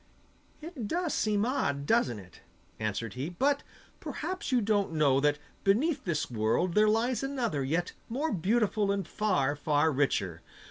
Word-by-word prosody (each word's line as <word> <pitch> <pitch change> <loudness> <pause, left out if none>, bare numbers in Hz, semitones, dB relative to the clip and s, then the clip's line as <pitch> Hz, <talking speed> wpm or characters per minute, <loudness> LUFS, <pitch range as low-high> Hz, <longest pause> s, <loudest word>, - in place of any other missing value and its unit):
'It 300 -9 -6
does 345 - -1
seem 210 -1 +1
odd, 140 - -1
doesn't 185 - +2
it?' 95 -3 -13 0.4
answered 110 0 -3
he. 130 +7 -4
'But 280 +10 +1 0.4
perhaps 375 -4 -4
you 250 - +4
don't 205 -5 +1
know 145 -4 +3
that 145 +1 +2 0.3
beneath 270 +9 +2
this 170 -4 -1
world 115 +11 +1
there 215 +2 +5
lies 230 +3 +1
another 250 - -1
yet 165 +6 -1 0.2
more 285 +7 -1
beautiful 205 +2 +1
and 195 -3 -2
far, 145 -10 +1
far 150 +1 +2
richer. 100 - 0
195 Hz, 150 wpm, -30 LUFS, 145-240 Hz, 0.4 s, there